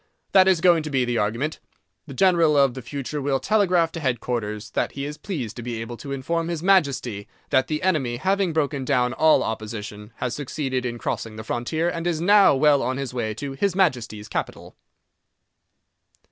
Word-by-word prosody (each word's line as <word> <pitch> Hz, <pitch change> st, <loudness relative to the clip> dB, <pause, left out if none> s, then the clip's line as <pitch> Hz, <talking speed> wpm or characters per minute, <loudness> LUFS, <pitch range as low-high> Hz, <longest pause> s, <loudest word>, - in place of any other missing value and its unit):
That 190 Hz, -1 st, +6 dB
is 185 Hz, -4 st, +3 dB
going 175 Hz, -2 st, +5 dB
to 155 Hz, -, -5 dB
be 130 Hz, -3 st, +1 dB
the 120 Hz, -1 st, -1 dB
argument. 115 Hz, +9 st, -1 dB, 0.5 s
The 140 Hz, -, -9 dB
general 170 Hz, -3 st, +4 dB
of 140 Hz, -3 st, +4 dB
the 130 Hz, -, -7 dB
future 140 Hz, +4 st, -5 dB
will 135 Hz, -1 st, 0 dB
telegraph 180 Hz, -1 st, +2 dB
to 165 Hz, -, -6 dB
headquarters 115 Hz, -5 st, -3 dB
that -, -, -1 dB
he 140 Hz, 0 st, -4 dB
is 150 Hz, +1 st, -7 dB
pleased 130 Hz, -, -5 dB
to -, -, -5 dB
be 120 Hz, -1 st, -4 dB
able 115 Hz, +1 st, -6 dB
to 140 Hz, -, -8 dB
inform 165 Hz, +5 st, -2 dB
His 170 Hz, -1 st, -4 dB
Majesty 140 Hz, -, +1 dB, 0.2 s
that 130 Hz, -2 st, +3 dB
the 155 Hz, +3 st, -3 dB
enemy, 140 Hz, -10 st, +1 dB
having 190 Hz, +4 st, +1 dB
broken 145 Hz, -3 st, -1 dB
down 125 Hz, -2 st, +1 dB
all 155 Hz, +3 st, +4 dB
opposition, 105 Hz, -1 st, -6 dB
has 125 Hz, -1 st, -3 dB
succeeded 130 Hz, -2 st, -3 dB
in 120 Hz, 0 st, -5 dB
crossing 115 Hz, -1 st, -4 dB
the 110 Hz, -, -7 dB
frontier 120 Hz, +9 st, -2 dB
and 170 Hz, 0 st, -2 dB
is 165 Hz, -3 st, 0 dB
now 200 Hz, -2 st, +5 dB
well 145 Hz, 0 st, +4 dB
on 130 Hz, +1 st, -1 dB
his 135 Hz, -3 st, -4 dB
way 110 Hz, -3 st, -2 dB
to 140 Hz, +5 st, -5 dB
His 180 Hz, +7 st, -1 dB
Majesty's 120 Hz, -, 0 dB
capital. -, -, -5 dB
140 Hz, 190 wpm, -23 LUFS, 120-165 Hz, 0.5 s, That